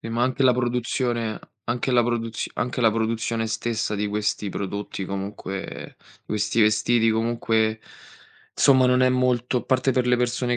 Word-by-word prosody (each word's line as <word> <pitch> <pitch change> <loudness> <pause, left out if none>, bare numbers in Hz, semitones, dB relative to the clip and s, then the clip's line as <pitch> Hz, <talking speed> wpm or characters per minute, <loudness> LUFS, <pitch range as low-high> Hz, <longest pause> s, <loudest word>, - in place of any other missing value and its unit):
Eh, - - -7
ma 115 +1 -1
anche 130 +2 +1
la 130 -1 +6
produzione 120 -2 -1 0.3
anche 120 +2 -2
la 120 -1 +4
produz 115 -1 -2
anche 125 +1 -2
la 115 -2 +5
produzione 115 0 -1
stessa 110 -1 -2
di 105 0 -1
questi 105 0 -1
prodotti, 100 0 -4
comunque, 95 0 -6 0.3
questi 105 +2 -1
vestiti, 110 +2 +3
comunque, 110 -1 0 0.7
somma 130 -2 +5
non 125 0 +3
è 130 - +5
molto 125 -1 +1
a - - -6
parte 130 0 +1
per 125 0 +1
le 125 0 +3
persone 120 0 0
115 Hz, 160 wpm, -24 LUFS, 110-125 Hz, 0.7 s, la